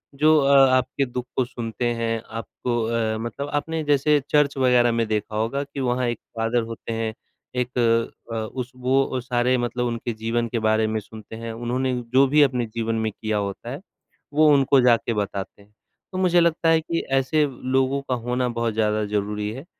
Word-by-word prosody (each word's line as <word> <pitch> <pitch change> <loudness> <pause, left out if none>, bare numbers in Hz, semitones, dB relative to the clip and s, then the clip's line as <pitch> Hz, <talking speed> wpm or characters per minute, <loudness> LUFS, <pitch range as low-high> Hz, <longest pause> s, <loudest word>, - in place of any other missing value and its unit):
जो 155 +2 +5
अ, 140 0 +5 0.2
आपके 130 +2 -1
दुख 125 0 -5
को 130 - +2
सुनते 120 -1 -5
हैं। 115 -1 -2
आपको 115 +1 -4
अ, 115 -1 0
मतलब 120 +6 -5
आपने 160 +2 -1
जैसे 145 0 +3
चर्च 145 -2 +2
वगैरह 125 -2 +4
में 115 -1 0
देखा 105 0 -2
होगा 120 +6 -1
कि 140 0 -8
वहाँ 125 -1 0
एक 120 - -2 0.2
फ़ादर 115 +1 +1
होते 115 0 -6
हैं, 115 -1 -2 0.4
एक 125 0 -2 0.6
अ, - - -3
उस 120 +3 -4
वो 130 +2 +2
अ, 130 - -3
सारे 125 0 +1
मतलब 125 0 -1
उनके 115 0 -3
जीवन 115 +2 -1
के 120 - -1
बारे 110 0 +2
में 110 0 -1
सुनते 110 +1 -11
हैं। 115 0 -6
उन्होंने 125 +3 -1 0.2
जो 135 +1 +6
भी 150 +3 +4
अपने 125 -3 +1
जीवन 115 0 -1
में 110 - -1
किया 110 +1 -3
होता 100 -1 -4
है, - - -5 0.5
वो 155 +1 +5
उनको 135 -1 +4
जाके 120 -1 +3
बताते 100 -1 -4
हैं। 105 +1 -23 0.4
तो 185 - -5
मुझे 180 -2 +3
लगता 170 -1 +2
है 165 0 +5
कि 165 +1 -2
ऐसे 135 +3 +2 0.3
लोगों 135 +1 +2
का 125 - +2
होना 125 +1 -1
बहुत 115 -1 -1
ज़्यादा 110 -1 +1
ज़रूरी 105 0 -2
है, 135 +6 -9
120 Hz, 195 wpm, -23 LUFS, 115-135 Hz, 0.6 s, जो